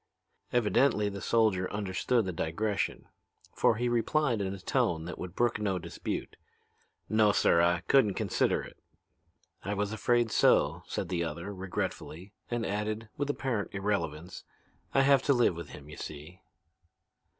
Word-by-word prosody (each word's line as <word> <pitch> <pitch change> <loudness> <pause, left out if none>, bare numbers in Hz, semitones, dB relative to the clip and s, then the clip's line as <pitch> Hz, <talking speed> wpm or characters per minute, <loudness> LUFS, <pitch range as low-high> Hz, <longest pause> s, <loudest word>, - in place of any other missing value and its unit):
Evidently 115 -2 +2
the 100 -1 -7
soldier 110 -5 +2
understood 105 +3 0
the 95 - -2
digression, 95 +6 -2 0.5
for - - +3
he 120 +2 -1
replied 120 0 +1
in 95 -1 -2
a 100 - -5
tone 80 -3 0
that 90 - -7
would 90 0 -7
brook 120 -2 +1
no 100 -3 0
dispute. 85 - -5 0.7
"No, 110 -1 +4
sir, 85 -4 +4
I 85 0 +2
couldn't 105 -3 +3
consider - - +1
it." - - -12 0.9
"I 100 +3 -2
was 105 +1 -1
afraid 120 +1 +1
so," - - +3
said 90 - -3
the 85 -2 0
other 85 +5 -5
regretfully, 95 0 -5 0.2
and 120 -2 -1
added, 105 +2 -3
with 145 0 -2
apparent 125 -8 -2
irrelevance, 90 -4 -3 0.5
"I 135 - +4
have 135 -1 +5
to 140 - +3
live 120 -8 +3
with 85 -3 -7
him, 70 -1 -11
you 75 - -10
see." 75 +5 -9
100 Hz, 150 wpm, -30 LUFS, 90-115 Hz, 0.9 s, have